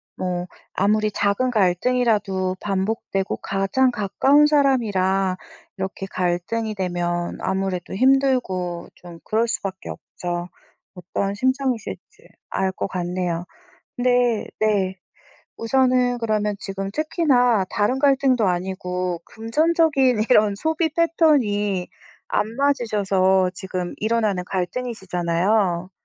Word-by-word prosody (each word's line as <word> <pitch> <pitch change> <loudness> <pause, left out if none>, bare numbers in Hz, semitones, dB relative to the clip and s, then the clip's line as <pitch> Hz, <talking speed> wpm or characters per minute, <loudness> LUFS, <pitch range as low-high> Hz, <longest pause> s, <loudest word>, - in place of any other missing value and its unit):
뭐 180 -1 -3 0.3
아무리 215 +2 +2
작은 205 +5 0
갈등이라도 200 -2 +1
반복되고 195 0 -2
가장 195 +7 +1
가까운 250 +7 +3
사람이라 200 -10 +2 0.4
이렇게 190 0 -4
갈등이 185 +5 -2
되면 175 -2 -2
아무래도 190 -1 -2
힘들고 250 -9 +1
좀 175 -2 -12
그럴 225 +2 +1
수밖에 190 -4 -4
없죠. 175 0 -5 0.4
어떠한 195 +2 -3
심정이실지 260 - -2 0.2
알 190 0 0
것 - - -3
같네요. 175 -1 -2 0.5
근데 245 -2 +2
네. 200 -3 +1 0.6
우선은 250 0 +2
그러면 215 -2 0
지금 195 0 -4
특히나 265 - +2
다른 210 +6 0
갈등도 270 -5 +3
아니고 180 -1 -2
금전적인 265 -1 +2
이런 210 -4 +5
소비 320 - 0
패턴이 250 - +2 0.4
안 - - +1
맞으셔서 200 -9 +2
지금 185 -1 -5
일어나는 215 -4 0
갈등이시잖아요. 185 -2 -1
205 Hz, 255 characters per minute, -22 LUFS, 185-250 Hz, 0.6 s, 이런